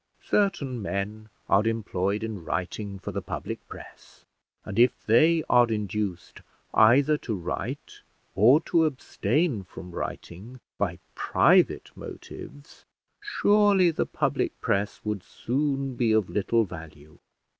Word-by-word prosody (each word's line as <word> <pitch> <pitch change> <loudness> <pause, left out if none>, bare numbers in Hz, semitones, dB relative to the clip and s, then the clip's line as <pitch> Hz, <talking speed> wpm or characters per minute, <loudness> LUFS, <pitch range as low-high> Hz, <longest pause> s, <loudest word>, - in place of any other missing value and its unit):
Certain 140 - 0
men 105 +2 -4 0.2
are 105 +3 +3
employed 105 -2 -1
in 110 -6 -5
writing 100 +4 -4
for 95 - -6
the - - -3
public - - -5
press; - - -13 0.4
and 105 +2 -3
if 125 +1 +3
they 160 +9 +4
are 120 -1 +5
induced 105 -4 -3 0.3
either 135 +7 +5
to 110 - -3
write 90 -3 -5 0.3
or 115 - +6
to 165 0 +2
abstain 145 - -1
from 90 0 -11
writing 100 +9 -7 0.2
by - - -1 0.2
private - - +3
motives, 145 +1 -11 0.4
surely 205 - +3
the - - -1
public - - -1
press 100 +1 -1
would 105 -2 -2
soon 135 +5 -2
be 120 -2 +1
of 110 -4 +1
little 115 +3 +2
value. 80 -5 -11
110 Hz, 125 wpm, -26 LUFS, 100-140 Hz, 0.4 s, or